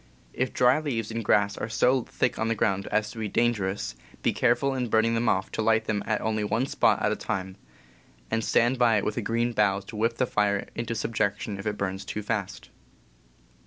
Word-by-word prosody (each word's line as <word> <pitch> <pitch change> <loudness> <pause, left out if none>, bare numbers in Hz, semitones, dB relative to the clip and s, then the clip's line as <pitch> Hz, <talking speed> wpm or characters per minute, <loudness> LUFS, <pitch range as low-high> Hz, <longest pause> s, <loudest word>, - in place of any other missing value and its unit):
If 130 0 -1
dry 125 +4 +4
leaves 115 -8 -3
and 115 0 -3
grass 100 0 +2
are 110 - -3
so 125 +4 +3
thick - - -1
on 110 - 0
the 115 - +1
ground 100 -2 0
as 110 -1 0
to 115 - -9
be 110 - -2
dangerous, 100 - 0 0.3
be - - +2
careful 130 +3 +2
in 125 -3 -2
burning 110 +1 +3
them 115 0 +1
off 95 +1 0
to - - -2
light 110 0 +2
them 105 -2 -1
at 110 - 0
only 110 -1 -1
one 110 +5 0
spot - - +2
at - - +2
a - - 0
time, 95 0 -4 0.8
and 115 - 0
stand 120 +3 +2
by 115 -3 +4
it 100 - -1
with 105 - -2
a - - 0
green 115 +3 0
bough 100 -2 +2
to 100 +3 -11
whip 115 +2 0
the 130 - +2
fire 105 -3 0
into 115 0 -3
subjection 105 -2 -2
if 95 - -5
it 105 -1 -2
burns 95 0 -3
too 105 +1 -5
fast. 100 -2 -4
110 Hz, 220 wpm, -27 LUFS, 100-115 Hz, 0.8 s, dry